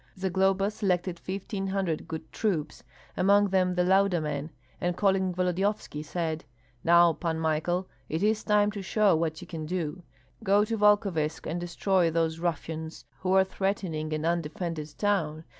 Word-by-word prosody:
Zagloba 190 +1 +1
selected 185 -4 -1
fifteen 195 +1 -4
hundred 190 -5 -2
good 160 -1 -7
troops, 165 -9 -2 0.3
among 200 +2 +4
them 185 -1 +2
the 180 - +2
Lauda 190 -1 +3
men, 150 -1 -3 0.3
and 175 0 -1
calling 190 -2 +2
Volodyovski, 180 -2 -1
said, 160 0 -3 0.4
"Now, 170 0 +6
Pan 165 +1 -2
Michael, 160 +4 0 0.2
it 160 +5 -1
is 215 +1 +2
time 210 -1 +3
to 205 -1 -6
show 195 0 +3
what 160 -1 -1
you 180 - -10
can 160 -3 -6
do. 175 0 -3 0.4
Go 205 +1 +4
to 225 +1 -2
Volkovysk 200 -7 +2
and 170 +2 -3
destroy 175 0 +1
those 165 0 0
ruffians 160 -1 -4
who 185 0 0
are 190 0 +6
threatening 190 -5 -2
an 155 0 -2
undefended 165 -1 -2
town. 165 -7 0
180 Hz, 155 wpm, -28 LUFS, 160-195 Hz, 0.4 s, Now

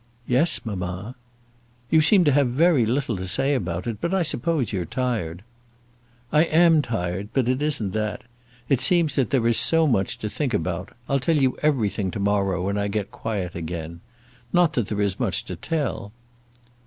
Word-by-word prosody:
"Yes, 130 +8 +2
mamma." 95 +1 -5 0.8
"You 160 - +5
seem 185 +4 +5
to 150 - +3
have 140 -1 +3
very 140 -2 +3
little 125 -1 -1
to 95 +1 -5
say 135 +10 +1
about 90 -8 -2
it; 115 -3 -5
but 170 +3 0
I 190 - +2
suppose 150 - -1
you're 95 -3 -1
tired." 95 -4 -3 0.9
"I 150 +2 +4
am 165 -1 +4
tired, 100 -5 -3
but 130 -3 +1
it 130 +2 0
isn't 145 -10 +1
that. 110 +4 -3 0.4
It 135 -3 +2
seems 165 0 +3
that 135 -4 0
there 130 -5 +1
is 115 -1 +4
so 165 0 +5
much 100 -10 0
to 105 - -4
think 125 +1 -2
about. 90 +2 -3 0.2
I'll 140 - +1
tell 160 +4 +1
you 130 -3 +2
everything 110 -10 0
to 95 - -5
morrow, 100 -2 0
when 100 +1 -1
I 100 - -1
get 100 +1 -3
quiet 105 -7 -4
again. 85 0 -6 0.5
Not 175 -2 +3
that 120 -6 -1
there 105 -1 -2
is 100 -2 -1
much - - 0
to - - -6
tell." 145 -10 -3
115 Hz, 185 wpm, -23 LUFS, 95-145 Hz, 0.9 s, You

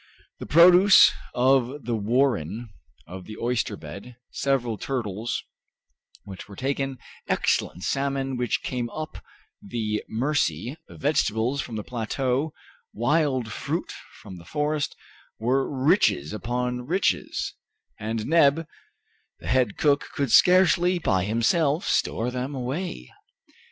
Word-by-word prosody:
The - - -7
produce 180 +5 +7 0.2
of 130 +1 +2
the 120 - -1
warren, 115 - 0 0.4
of 90 0 -9
the 110 0 -9
oyster 115 -3 -1
bed, 100 +11 -10 0.2
several 130 -5 0
turtles 115 -4 -3 0.8
which 95 -1 -10
were 100 - -10
taken, 135 +1 -2 0.3
excellent 90 - 0
salmon 135 -1 -1
which 125 -2 -1
came 120 -2 -3
up 155 +4 -7 0.4
the 105 0 -3
Mercy, 120 - -1
vegetables 135 -2 0
from 115 - -7
the 105 - -4
plateau, 130 +5 -2 0.4
wild 130 -1 0
fruit - - -3 0.3
from 90 -2 -10
the - - -13
forest, 150 - -1 0.4
were 130 +4 0
riches 130 - +2
upon 125 +3 -3
riches, 185 +5 0 0.5
and 110 +1 -3
Neb, 160 0 +4 0.7
the - - -10
head 125 -5 +1
cook, 145 -2 +2
could 140 -4 -1
scarcely 180 +3 +5
by 95 - +1
himself 140 - +1
store 120 +2 0
them 130 +3 -4
away. 130 - -4
125 Hz, 115 wpm, -25 LUFS, 110-140 Hz, 0.8 s, produce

